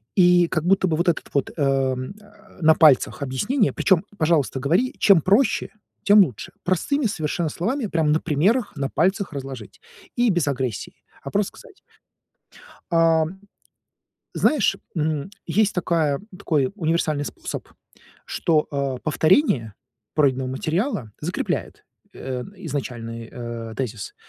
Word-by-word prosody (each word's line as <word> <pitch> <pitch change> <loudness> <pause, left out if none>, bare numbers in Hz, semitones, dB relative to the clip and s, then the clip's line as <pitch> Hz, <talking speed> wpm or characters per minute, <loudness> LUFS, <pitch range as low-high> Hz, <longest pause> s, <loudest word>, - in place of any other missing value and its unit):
И 175 -2 +5
как 160 -1 -1
будто 190 +1 +3
бы 160 - 0
вот 170 +2 0
этот 170 - 0
вот, 140 -2 0
эм, 135 -1 0
э, 210 +1 -20
на 160 -1 +6
пальцах 155 -2 +4
объяснение. 205 - 0
Причём, 190 -2 +2
пожалуйста, 155 -5 +1
говори: 175 - +1
"Чем 195 -5 +6
проще, 205 - +2 0.3
тем 205 +1 +6
лучше". 125 - -8
Простыми 235 - 0
совершенно 165 -4 -1
словами, 225 - -2
прямо 160 -5 +1
на 155 +2 +2
примерах, 195 - +1
на 140 -1 -2
пальцах 190 +4 0
разложить. 135 -6 -8 0.3
И 240 0 +2
без 175 -6 +1
агрессии, 130 -6 -3 0.3
а 140 - -6
просто 200 +3 -1
сказать. 465 -6 -16 1.1
Ам, 165 +2 +2 0.9
знаешь, 290 -9 +2 0.2
м, 155 0 -1 0.2
есть 210 -1 +2
такая 165 -5 0 0.2
такой 150 -8 0
универсальный 160 -5 0
способ, - - -6 0.6
что, 155 -3 +1
э, 140 -2 -2
повторение 155 - +2 0.4
пройденного 135 -3 +2
материала 155 - -2
закрепляет, 175 +4 -3 0.3
э, 125 -2 -5
изначальный, 120 -8 -5
э, 120 -2 -6
тезис. 115 -6 -4
160 Hz, 130 wpm, -23 LUFS, 135-190 Hz, 1.1 s, на